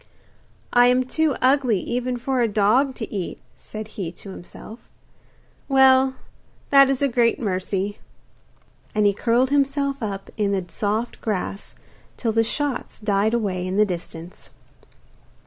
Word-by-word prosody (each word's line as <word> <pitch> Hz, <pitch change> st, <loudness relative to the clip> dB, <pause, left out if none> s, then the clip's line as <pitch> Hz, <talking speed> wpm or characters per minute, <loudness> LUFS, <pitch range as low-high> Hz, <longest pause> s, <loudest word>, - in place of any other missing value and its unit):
'I 245 Hz, 0 st, +6 dB
am 250 Hz, +1 st, +3 dB
too 305 Hz, +3 st, 0 dB
ugly 255 Hz, -6 st, +3 dB
even 245 Hz, +4 st, -2 dB
for 255 Hz, +1 st, -1 dB
a 235 Hz, -, +3 dB
dog 220 Hz, +6 st, +2 dB
to 220 Hz, -, -7 dB
eat,' 190 Hz, -4 st, -4 dB, 0.2 s
said 215 Hz, 0 st, -9 dB
he 185 Hz, -6 st, -5 dB
to 195 Hz, -, -11 dB
himself. 215 Hz, +5 st, -12 dB, 0.8 s
'Well, 265 Hz, -1 st, +5 dB, 0.6 s
that 275 Hz, -1 st, +7 dB
is 275 Hz, 0 st, 0 dB
a -, -, +4 dB
great 235 Hz, -2 st, +2 dB
mercy.' 195 Hz, -1 st, -2 dB, 1.0 s
And 210 Hz, -1 st, +3 dB
he 200 Hz, -, +4 dB
curled 240 Hz, +5 st, +1 dB
himself 280 Hz, -1 st, 0 dB
up 200 Hz, -3 st, -5 dB
in 205 Hz, -2 st, +1 dB
the 190 Hz, -2 st, -1 dB
soft 215 Hz, +5 st, -2 dB
grass 200 Hz, -2 st, -4 dB, 0.4 s
till 230 Hz, -, -1 dB
the 225 Hz, +1 st, +2 dB
shots 280 Hz, +3 st, -3 dB
died 210 Hz, +1 st, +1 dB
away 185 Hz, -5 st, -2 dB
in 185 Hz, +2 st, -2 dB
the 210 Hz, -, +5 dB
distance. 175 Hz, -2 st, -8 dB
225 Hz, 145 wpm, -23 LUFS, 200-260 Hz, 1.0 s, that